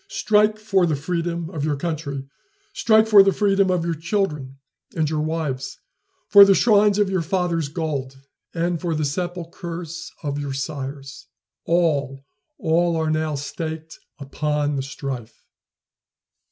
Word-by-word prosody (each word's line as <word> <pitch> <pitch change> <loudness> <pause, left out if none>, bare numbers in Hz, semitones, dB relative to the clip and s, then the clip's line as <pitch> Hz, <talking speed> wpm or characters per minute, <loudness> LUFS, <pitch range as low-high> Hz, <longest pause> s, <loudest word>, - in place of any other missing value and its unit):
Strike 210 0 +2
for 195 -4 +1
the 155 - +1
freedom 170 +2 -3
of 155 -5 -4
your 150 -1 0
country! 140 -3 -4 0.5
strike 220 -1 +4
for 210 -2 +8
the 195 0 +4
freedom 195 -1 +2
of 180 -2 0
your 170 - 0
children 160 -5 -2 0.4
and 160 - +1
of 150 - 0
your 155 - -1
wives 150 -5 -3 0.5
for 200 -1 +9
the 195 -1 +6
shrines 210 -2 +4
of 205 -1 +3
your 190 -2 0
fathers' 170 -2 -1
gods, 140 -4 -4 0.3
and 170 0 -1
for 170 -3 -1
the 155 -1 -1
sepulchres 170 0 -5
of 145 -1 -2
your 140 -1 -4
sires. 135 -1 -6 0.4
All 145 -6 0 0.3
all 170 +1 +1
are 160 -1 0
now 155 -1 -1
staked 160 +3 -6 0.2
upon 150 +1 -2
the 135 - -1
strife." 135 -4 -7
160 Hz, 145 wpm, -22 LUFS, 145-180 Hz, 0.5 s, for